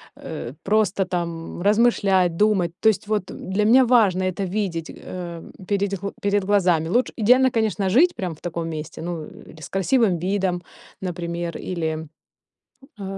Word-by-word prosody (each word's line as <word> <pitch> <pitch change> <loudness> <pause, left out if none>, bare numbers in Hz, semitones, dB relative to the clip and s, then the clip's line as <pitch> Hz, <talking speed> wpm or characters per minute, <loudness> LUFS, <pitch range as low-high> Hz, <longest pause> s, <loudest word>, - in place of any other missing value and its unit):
э, 120 +2 -7
просто 205 -2 +2
там 170 -2 -4
размышлять, 200 -4 +3
думать. 200 -5 +2
То 220 - +5
есть, 210 -1 -1
вот, 210 -3 -1
э, - - -8
для 200 +3 -1
меня 255 +4 +6
важно 210 -7 +4
это 185 +1 -1
видеть, 180 -4 -3
э, 170 -2 -7 0.3
передь 200 -2 0
гл 200 - -4
перед 200 -1 +1
глазами. 180 -5 +2
Луч 245 +7 +1
идеально, 250 +4 +4
конечно, 215 -4 0
жить 325 - +4
прям 180 -3 -3
в 155 - -15
таком 170 -1 -4
месте. 155 -2 -6
Ну, 170 -1 -4
или 160 - -14
с - - -8
красивым 195 0 +2
видом, 185 -3 0 0.4
например, 170 -2 -4
или, 160 -3 -3 0.9
а, - - -5
190 Hz, 160 wpm, -23 LUFS, 170-210 Hz, 0.9 s, меня